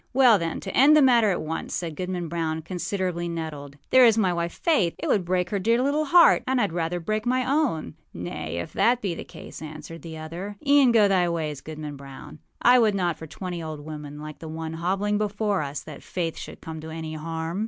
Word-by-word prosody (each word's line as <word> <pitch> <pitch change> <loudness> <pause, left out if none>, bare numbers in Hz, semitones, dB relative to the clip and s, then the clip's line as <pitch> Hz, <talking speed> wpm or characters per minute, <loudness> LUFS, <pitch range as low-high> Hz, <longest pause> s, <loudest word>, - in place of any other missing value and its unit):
â - - -40 0.2
âWell, 240 -6 +7
then, 165 -1 -3
to - - -6
end 295 +4 +7
the - - +6
matter 240 -5 +5
at 180 - -1
once,â 160 +1 -4
said 165 -3 -4
Goodman 180 0 -3
Brown, 160 -1 -2
considerably 180 0 -3
nettled, 150 -4 -6
âthere 255 -1 +8
is 225 -1 +4
my 190 -5 +2
wife, 170 0 -2
Faith. 215 - +1
It - - -5
would 200 - +2
break 180 0 -1
her 200 - 0
dear 230 +5 +2
little 285 +4 +1
heart; 340 +4 +6
and 260 0 +2
Iâd 205 -6 +1
rather 170 +1 -2
break 215 +6 -2
my 255 +1 +1
own.â 275 - 0 0.3
âNay, 80 -2 -5
if - - -12
that 240 +1 +3
be 190 -4 -1
the - - -6
case,â - - -11
answered 155 +2 -10
the 160 -1 -8
other, 170 +6 -6
âeâen 280 -3 +6
go 220 -3 +5
thy 185 -3 +2
ways, 155 -4 -3
Goodman 150 -2 -7
Brown. 135 +2 -11 0.2
I 250 +1 +7
would 215 -3 +3
not 175 -4 0
for 160 - -10
twenty 175 +1 -6
old 155 -2 -6
women 150 -1 -8
like 155 0 -8
the 160 - -8
one 160 0 -5
hobbling 195 +5 0
before 205 -2 0
us 145 0 -5
that 155 -3 -10
Faith 170 -3 -3
should - - -9
come 160 -1 -7
to 160 - -8
any 160 0 -6
harm. 165 +3 -4
175 Hz, 225 wpm, -25 LUFS, 160-210 Hz, 0.3 s, âthere